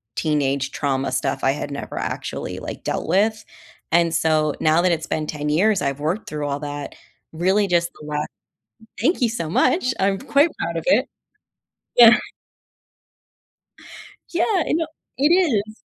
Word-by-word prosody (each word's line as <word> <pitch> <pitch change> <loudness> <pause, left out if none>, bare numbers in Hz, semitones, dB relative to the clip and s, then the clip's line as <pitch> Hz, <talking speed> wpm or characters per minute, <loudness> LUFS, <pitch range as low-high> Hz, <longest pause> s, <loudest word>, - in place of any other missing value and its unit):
teenage 140 -3 0
trauma 135 -2 -1
stuff 130 +1 -2
I 135 - +4
had 145 0 -4
never 140 - -6
actually, - - -4
like, - - -7
dealt - - -2
with, 215 +3 +2 0.5
and 170 0 +3
so 155 -2 +2
now 160 +2 +4
that 180 - +3
it's 160 0 -3
been 155 -1 -2
10 150 -1 -3
years, 190 +6 +2
I've 140 0 -2
worked 165 +9 -2
through 150 -1 -3
all 140 0 -2
that, 145 -1 -6 0.4
really 190 +5 +2
just 170 -1 +1
the 150 - -10
la 150 0 -1 0.8
thank 335 -3 +1
you 240 - +4
so 170 -9 -4
much, 255 - +2
I'm 195 0 +2
quite 285 +4 +3
proud - - -3
of - - -5
it. - - +4 0.9
Yeah. 235 -1 +9 2.2
Yeah, 350 +1 +2
and 320 - +1
o - - -2 0.3
it 285 - +4
is. 225 - +1
170 Hz, 160 wpm, -22 LUFS, 150-220 Hz, 2.2 s, Yeah